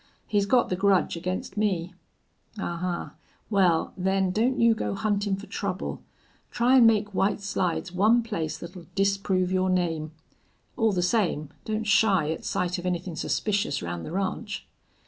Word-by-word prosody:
He's 205 -1 +1
got 245 +2 +3
the 185 - 0
grudge 190 -1 +2
against 185 +3 -4
me." 185 -4 0 0.6
"Ahuh! 175 -2 -3 0.4
Wal, 180 -5 +3
then, 190 0 +1
don't 235 +7 +1
you 230 -1 +5
go 220 - -3
huntin' 205 -1 0
fer 195 +2 -9
trouble. 195 -3 -4 0.5
Try 245 +2 +3
an' 235 -3 +8
make 210 -2 +2
White 195 +2 +1
Slides 185 -3 -2
one 215 +6 +3
place 165 -9 -3
thet'll 170 -1 -10
disprove 195 -2 +1
your 185 0 +1
name. 165 -4 0 0.6
All 225 -2 +2
the 180 -2 0
same, 180 -7 +1 0.2
don't 220 0 -2
shy 200 -7 +3
at 160 - -5
sight 180 0 -1
of 180 - -4
anythin' 180 -1 -2
suspicious 200 - -1
round 85 -1 -4
the - - -7
ranch." 195 +3 -3
190 Hz, 155 wpm, -26 LUFS, 175-210 Hz, 0.6 s, an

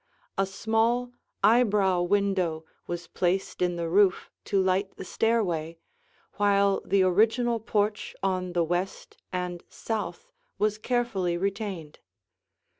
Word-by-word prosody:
A 195 -1 +1
small 225 +5 0 0.3
eyebrow 205 -6 +4
window 185 -4 0 0.2
was 175 0 -4
placed 180 +2 -1
in 175 -1 +1
the 170 -1 -2
roof 190 +2 +3
to 200 - +1
light 190 +1 +1
the 190 - -7
stairway, 175 -8 0 0.6
while 200 -1 +3
the 195 -1 +3
original 225 +5 +3
porch 210 -1 -1
on 185 -2 -1
the 175 -1 +2
west 175 +3 -3
and 180 -1 -3
south 225 - -5 0.3
was 210 0 0
carefully 215 -8 0
retained. 195 -5 -4
195 Hz, 115 wpm, -27 LUFS, 180-215 Hz, 0.6 s, eyebrow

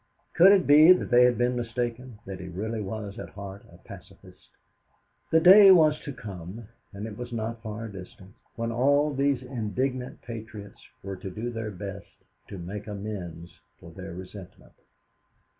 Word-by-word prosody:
Could 185 +3 +7
it 195 -2 +4
be 155 +5 +8
that 180 - -4
they 125 0 +7
had 125 -2 +2
been 120 +1 +1
mistaken, 120 0 -4
that 95 -1 -7
he 90 - -8
really 110 +5 -4
was 105 +1 -6
at - - -7
heart 100 0 -9
a - - -16
pacifist? - - -15 0.8
The 160 - +4
day 195 +4 +9
was 155 -5 +6
to 145 - -7
come 100 -1 -9 0.2
and 100 +1 -7
it 110 -2 -7
was 120 +2 -8
not 115 0 -4
far 110 0 -6
distant 95 -1 -12 0.2
when 115 0 -3
all 145 +5 +2
these 140 -1 0
indignant 125 +1 -4
patriots 110 -3 -9 0.2
were 95 0 -6
to 95 - -7
do 110 +6 -5
their 115 -2 -5
best 100 0 -8 0.4
to 100 - -8
make 100 +4 -7
amends 100 -5 -7 0.2
for - - -13
their 85 - -9
resentment. 95 0 -12
110 Hz, 165 wpm, -26 LUFS, 100-125 Hz, 0.8 s, day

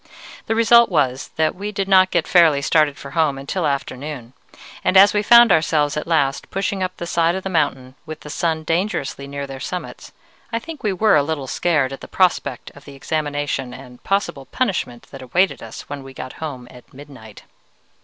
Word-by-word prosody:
The 225 - 0
result 235 +1 +5
was 135 -6 0
that 155 0 +1
we 205 +3 -6
did 195 -2 -3
not 190 -1 +5
get 170 -3 0
fairly 160 -6 +4
started 150 -1 +2
for 140 - -10
home 155 -4 +1
until 145 +7 -2
afternoon, 140 -2 -5 0.5
and 190 - +3
as 200 +2 +7
we 210 - +2
found 235 +1 +7
ourselves 155 -3 +2
at 150 - -4
last 145 -5 0
pushing 195 0 -2
up 185 0 -3
the 170 - -5
side 170 0 +1
of 190 - -5
the 195 - -4
mountain 135 -6 -1
with 155 0 -8
the 150 - -9
sun 160 -1 -1
dangerously 165 -5 -2
near 140 0 -5
their 135 -1 -8
summits, 180 +7 -7 0.4
I 230 - -1
think 305 +6 -8
we 210 - 0
were 210 +3 +3
a 145 - +5
little 145 -1 -3
scared 145 -2 0
at 135 - -9
the - - -9
prospect 185 -2 0
of 140 +1 -17
the 140 - -11
examination 145 -3 -3
and 125 -2 -13
possible 195 -9 -2
punishment 180 - -2
that 135 - -10
awaited 180 +10 0
us - - -9
when 145 -1 -8
we 135 0 -12
got 130 0 -7
home 130 -6 -6
at 125 -1 -16
midnight. 130 -6 -13
155 Hz, 200 wpm, -20 LUFS, 135-185 Hz, 0.5 s, as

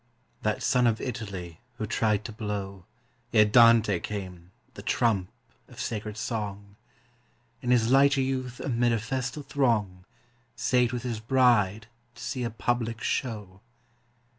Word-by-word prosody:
_ - - -43 0.4
That 105 0 -1
son 125 -2 +3
of 115 -1 +1
Italy 95 -9 -6 0.2
who 110 - -2
tried 105 -1 0
to 115 - -5
blow, 100 -4 -5 0.5
Ere 105 - +6
Dante 110 -3 +5
came, 90 -4 -6 0.2
the - - -9
trump 100 -6 +1 0.4
of - - -14
sacred 105 -1 -4
song, 100 -3 -4 0.9
In 125 - -3
his 120 -1 +3
light 140 +1 +5
youth 130 -2 -2
amid 120 -2 +1
a - - +2
festal 130 +5 -3
throng 115 -10 0 0.5
Sate 125 -2 +2
with 125 -2 -4
his 120 -3 -3
bride 110 -4 +3 0.3
to 120 - -10
see 125 +1 -3
a 120 - -1
public 115 0 -2
show. 105 -7 -3
115 Hz, 140 wpm, -27 LUFS, 105-125 Hz, 0.9 s, Ere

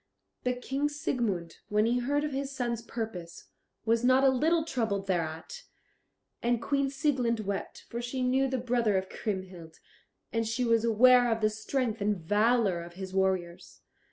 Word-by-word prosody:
But 250 0 -2
King 280 +2 0
Siegmund, 235 - -2
when 210 +1 +3
he 240 +2 +2
heard 285 +4 0
of 300 - -2
his 275 0 -3
son's 240 -4 -2
purpose, 220 -8 -6 0.4
was 230 +1 +2
not 255 +2 +5
a 270 - +7
little 315 +5 +2
troubled 220 -9 -1
thereat; 170 - -3 0.8
and 240 0 +1
Queen 275 +3 0
Sieglind 260 -5 0
wept, 200 -2 -5
for 235 - -4
she 255 +2 -3
knew 260 +2 +2
the 260 0 -1
brother 235 -4 +1
of 190 0 -3
Kriemhild, 185 -6 -5 0.5
and 230 -1 0
she 230 +3 0
was 230 -1 +3
aware 245 +2 +5
of 225 0 0
the 215 0 +3
strength 225 +1 -2
and 205 0 +1
valour 205 +1 +2
of 170 0 -10
his 190 +1 -7
warriors. 190 -3 -1
230 Hz, 165 wpm, -29 LUFS, 195-255 Hz, 0.8 s, a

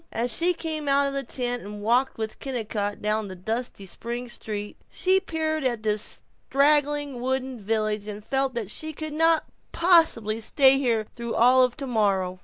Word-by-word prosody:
As 230 0 0
she 350 +1 +2
came 315 -3 -4
out 280 0 +3
of 275 - -2
the 275 - -1
tent 245 -1 -2
and 205 0 -8
walked 245 +4 +2
with 220 -1 -4
Kennicott 215 -6 -3
down 215 0 0
the 190 - -8
dusty 220 +2 -4
spring 235 +6 -5
street, 210 -3 -5
she 375 +1 +2
peered 315 -4 -2
at 240 -4 -1
this 210 -1 0 0.3
straggling 290 -2 +2
wooden 260 -1 -2
village 215 0 -1
and 210 0 -7
felt 270 0 0
that 220 -4 -3
she 315 +5 -4
could 310 0 -6
not 325 +1 +3 0.3
possibly 325 - +3
stay 270 +4 +4
here 230 -5 +1
through 235 -1 -5
all 250 +2 +5
of 250 +1 +1
tomorrow. 200 -9 0
245 Hz, 175 wpm, -25 LUFS, 215-280 Hz, 0.3 s, all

